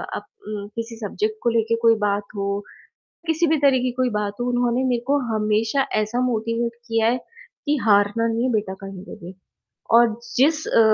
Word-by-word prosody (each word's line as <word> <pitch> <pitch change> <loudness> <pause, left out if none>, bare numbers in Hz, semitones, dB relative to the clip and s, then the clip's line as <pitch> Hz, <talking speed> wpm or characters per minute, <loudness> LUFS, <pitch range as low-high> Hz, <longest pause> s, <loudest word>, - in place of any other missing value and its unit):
अब - - -5 0.2
उम, 205 -1 -5
किसी 230 0 -5
सब्जेक्ट 430 - -2
को 235 - +3
लेके 230 0 +1
कोई 230 -1 +6
बात 205 0 0
हो, 200 0 -1 0.7
किसी 325 +1 +2
भी 315 0 +3
तरह 275 -2 +4
की 255 - 0
कोई 255 -1 +3
बात 205 -1 -2
हो, 245 - 0
उन्होंने 245 +1 +1
मेरे 240 -1 +1
को 285 +1 +3 0.2
हमेशा 215 +5 +1
ऐसा 215 +4 -2
मोटिवेट 230 0 -1 0.2
किया 225 0 +2
है, 250 - +1 0.5
कि 295 0 +2
हारना 205 +2 +3
नहीं 230 +3 0
बेटा 210 -3 -1
कहीं 195 -1 -8
पे - - -9
भी। 180 - -8 0.6
और 230 -2 +5 0.2
जिस 305 +4 +3
अ, - - +3
230 Hz, 185 wpm, -22 LUFS, 210-250 Hz, 0.7 s, कोई